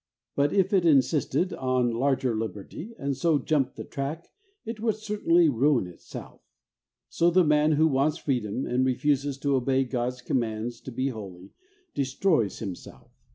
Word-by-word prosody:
But 145 +1 +2
if 195 0 +2
it 190 -3 +4
insisted 155 +4 +2
on 130 -2 0
larger 130 0 0
liberty, 110 - -6
and 140 0 -2
so 165 +1 +2
jumped 140 -3 0
the - - -6
track, 145 +4 -5 0.4
it 225 0 -5
would 220 -1 0
certainly 205 -6 +2
ruin 135 -3 +2
itself. 90 -1 -11 0.7
So 170 - +2
the 180 +1 +4
man 150 0 +3
who 155 +2 +4
wants 145 +2 +1
freedom, 125 -5 -2
and 125 +1 +1
refuses 140 +1 0
to 140 -1 +1
obey 135 +1 +2
God's 125 -1 -3
commands 115 -1 -2
to 130 - -8
be 130 +3 -1
holy, 95 -6 -9 0.4
destroys 135 - +1
himself. 95 -5 -8
135 Hz, 155 wpm, -27 LUFS, 120-155 Hz, 0.7 s, it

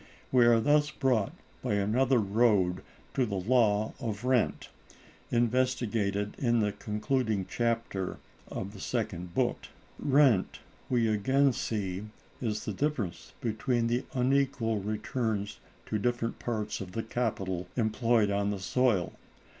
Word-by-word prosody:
We 125 -2 +6
are 115 -1 +6
thus 145 +5 +3
brought 125 -8 +1 0.3
by 105 - 0
another 120 +6 +2
road 100 -4 +2 0.3
to 130 - +2
the 105 -5 -2
Law 110 +1 +2
of 115 -2 -4
Rent, 130 -2 +1 0.6
investigated 115 -4 +1
in 120 -3 +2
the 105 -1 +1
concluding 105 -1 -1
chapter 115 -5 -1 0.3
of 100 +1 -5
the 100 - -10
Second 95 -7 -3
Book. - - 0 0.3
Rent, 135 -8 +3 0.3
we 120 -3 +2
again 130 +6 +3
see, 100 -4 -3 0.4
is 105 -4 -2
the 105 - -2
difference 120 - -2
between 115 +2 0
the 120 +2 0
unequal 130 -3 +1
returns 105 0 -2 0.3
to 110 - -2
different 120 +1 -1
parts 110 -4 -3
of 90 -1 -7
the 115 - -2
capital 95 -6 -2
employed 115 -2 +2
on 100 0 +1
the 100 -1 -2
soil. 100 -1 +1
115 Hz, 130 wpm, -30 LUFS, 100-125 Hz, 0.6 s, We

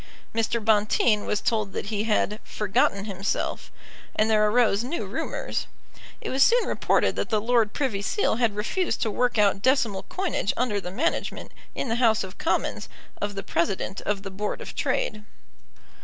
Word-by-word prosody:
Mr. 225 +1 0
Bonteen 210 0 +2
was 210 - 0
told 215 -4 0
that - - -3
he 210 +1 0
had 210 -1 +1
forgotten 200 -1 0
himself; 195 -1 -3 0.4
and 220 +1 +2
there 215 -1 +4
arose 225 -2 +3
new 290 +8 -3
rumours. - - -3 0.5
It - - -4
was 265 - +1
soon 480 - +5
reported - - +2
that - - -1
the 215 - +2
Lord 225 -1 +2
Privy 235 -8 -1
Seal 225 - +1
had 230 -4 +1
refused 230 - -1
to 220 - 0
work 245 +2 +1
out 200 -2 +3
decimal 235 -6 +2
coinage 375 - -1
under 220 -5 0
the 180 - -5
management, 275 - -2 0.2
in - - -2
the 230 0 0
House 220 -4 +4
of 190 0 -9
Commons, 330 - -1 0.3
of 205 0 -2
the 195 - -4
President 190 +2 -1
of 200 -1 -2
the 195 - -6
Board 205 +2 -3
of - - -8
Trade. 215 -1 -1
215 Hz, 170 wpm, -26 LUFS, 205-245 Hz, 0.5 s, soon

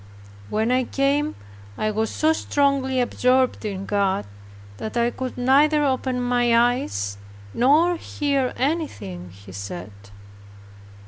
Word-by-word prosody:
When 220 +3 0
I 255 0 +2
came, 285 +4 0 0.4
I 215 - 0
was 220 +1 -1
so 315 +1 +2
strongly 275 -4 +1
absorbed 250 +1 +2
in 195 -2 -4
God, 200 -1 0 0.5
that 220 +2 -5
I 235 0 +2
could 255 0 -5
neither 290 +4 +4
open 260 -1 0
my 245 -1 +2
eyes, 100 - 0 0.3
nor 315 +8 +4
hear 280 -5 -1
anything 255 - -3
he 95 +2 -14
said. 100 0 -7
250 Hz, 120 wpm, -23 LUFS, 205-275 Hz, 0.5 s, neither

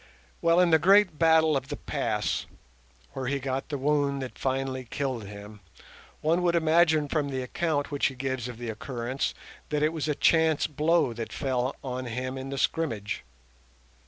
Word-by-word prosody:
Well, 170 +1 +4
in 180 -2 +4
the 160 - +6
great 190 -1 +5
battle 160 -1 +5
of 135 -1 -2
the - - -5
Pass, - - -2 0.7
where 130 -2 -4
he 140 +2 0
got 135 +1 -3
the 145 - -2
wound 140 0 +1
that 130 - -7
finally 130 -1 -2
killed 130 -6 -3
him, 105 +1 -10 0.6
one 165 +3 +2
would 175 -1 +2
imagine 160 -2 +4
from 145 -1 -1
the 130 -1 -2
account 145 +1 -1
which 145 - +2
he 135 - -6
gives 130 -1 -3
of 125 -2 -7
the 120 -1 -4
occurrence 120 +3 -3 0.3
that 150 0 0
it 155 +1 +2
was 155 -2 -2
a 150 - 0
chance 160 -1 +3
blow 155 -3 +2
that 115 0 -6
fell 130 -2 -1
on 130 -1 -4
him 130 +2 -3
in 135 0 -6
the 140 - -4
scrimmage. 120 -9 -1
140 Hz, 180 wpm, -27 LUFS, 130-160 Hz, 0.7 s, the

